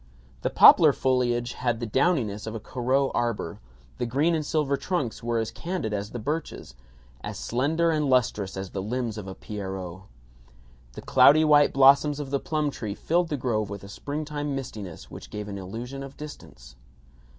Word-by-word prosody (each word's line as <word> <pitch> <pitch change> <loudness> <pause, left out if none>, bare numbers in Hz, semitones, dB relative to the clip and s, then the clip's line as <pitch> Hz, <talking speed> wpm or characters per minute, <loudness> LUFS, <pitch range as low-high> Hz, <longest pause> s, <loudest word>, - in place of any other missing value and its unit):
The - - 0
poplar - - +8
foliage 120 -2 0
had 120 -2 -1
the 120 - -3
downiness 115 - 0
of 110 - -5
a - - -4
Corot 130 +4 0
arbor; 120 -2 -2 0.4
the 120 - -1
green 145 +8 +2
and 160 -2 0
silver 145 -2 0
trunks 140 -8 -3
were 120 0 -1
as 110 -1 -1
candid 170 - -4
as 100 0 -3
the 120 - -6
birches, 145 - -4 0.5
as - - -5
slender 160 +7 0
and 150 -3 0
lustrous 105 -7 +1
as 95 -1 -5
the 95 - -3
limbs 115 +1 -3
of 100 - -8
a 95 - -7
Pierrot. 95 -3 -6 0.9
The - - -9
cloudy 155 +2 +6
white 145 -1 +5
blossoms 140 +2 +5
of 140 -2 -5
the 140 - +1
plum 150 -1 -1
trees 110 -6 -5
filled 170 +1 +1
the 150 - -1
grove 110 -5 -1
with 100 -1 -7
a - - -9
springtime 145 +4 -4
mistiness 105 -10 -7
which - - -10
gave 105 -1 -6
an 100 -1 -6
illusion 120 +8 -7
of 135 0 -9
distance. - - -11
125 Hz, 180 wpm, -26 LUFS, 105-145 Hz, 0.9 s, poplar